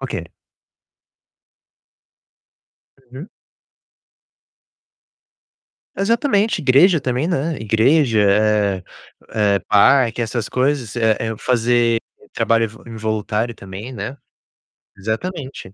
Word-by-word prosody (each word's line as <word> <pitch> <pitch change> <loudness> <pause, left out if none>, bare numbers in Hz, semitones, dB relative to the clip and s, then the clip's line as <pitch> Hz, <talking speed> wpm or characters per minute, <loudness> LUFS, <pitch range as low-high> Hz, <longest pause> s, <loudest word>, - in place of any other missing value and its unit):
Ok. 95 -11 -5 2.8
Uhum. 135 +8 -9 2.7
Exatamente, 220 0 +1
igreja 155 +6 +5
também, 130 +3 -1
né, 160 -2 -1
igreja, 115 +3 +2
eh 100 -2 +2 0.5
eh, 100 -2 +1
parque, 120 +3 +4
essas 115 -1 -3
coisas, 130 -4 -1
eh 110 -2 +2
eh, 110 -1 -3
fazer 120 -1 +1 0.3
trabalho 115 0 +2
ev 110 0 -10
involuntário 110 0 -2
também, 100 +5 -9
né. 115 +5 -6 0.8
Exatamente. 130 - -5
115 Hz, 80 wpm, -19 LUFS, 110-135 Hz, 2.8 s, igreja